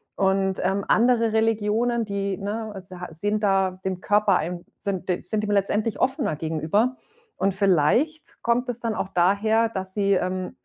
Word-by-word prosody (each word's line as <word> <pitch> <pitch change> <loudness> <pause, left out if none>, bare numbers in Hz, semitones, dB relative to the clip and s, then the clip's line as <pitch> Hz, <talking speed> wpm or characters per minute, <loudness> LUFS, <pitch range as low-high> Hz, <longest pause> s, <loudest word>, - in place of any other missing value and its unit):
Und, 190 -1 +1
ähm, 195 +2 0
andere 230 -1 +3
Religionen, 225 +2 +1
die, 200 -1 -2
ne, 215 +2 -4
a 195 - -6
sa 180 -1 -8
sind 205 +6 -1
da 190 -2 +1
dem 185 -1 -2
Körper 205 -2 +3
ein 175 +2 -4
sind 190 -3 -3
d 180 - 0
sind 215 -1 -2
dem 210 - -1
letztendlich 205 +2 0
offener 265 - 0
gegenüber. 165 - 0 0.4
Und 195 0 +1
vielleicht 200 - +1
kommt 240 +2 +1
es 240 -1 -3
dann 230 -2 -1
auch 190 - -3
daher, 205 +6 +2
dass 190 -3 -5
sie, 200 -1 +2
ähm, 185 0 -2
200 Hz, 170 wpm, -24 LUFS, 185-225 Hz, 0.4 s, andere